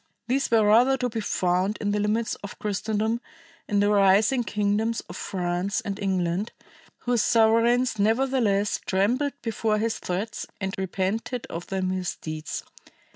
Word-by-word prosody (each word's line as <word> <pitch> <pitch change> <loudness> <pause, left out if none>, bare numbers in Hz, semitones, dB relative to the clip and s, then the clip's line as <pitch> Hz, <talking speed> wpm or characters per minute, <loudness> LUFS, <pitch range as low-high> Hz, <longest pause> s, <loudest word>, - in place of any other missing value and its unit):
These 270 +3 +1
were 225 -2 +4
rather 245 +6 +5
to 250 -1 -1
be 225 -1 -3
found 185 +1 0
in 205 -1 -1
the 210 - 0
limits 215 +2 0
of 200 - -8
Christendom 215 +2 -1 0.5
in 205 -1 +2
the 205 0 +3
rising 205 +5 +4
kingdoms 215 +2 0
of - - -11
France 180 +2 -2
and 205 -4 -5
England, 190 +1 -1 0.5
whose 245 -2 +1
sovereigns 230 +1 +3
nevertheless 220 -2 +2
trembled 240 +10 +1
before 225 -2 0
his 225 +1 -1
threats 195 +5 -4
and 190 -1 -3
repented 195 +6 -2
of 170 +1 -6
their 190 -1 -2
misdeeds. 175 -4 -3
210 Hz, 140 wpm, -25 LUFS, 195-230 Hz, 0.5 s, rather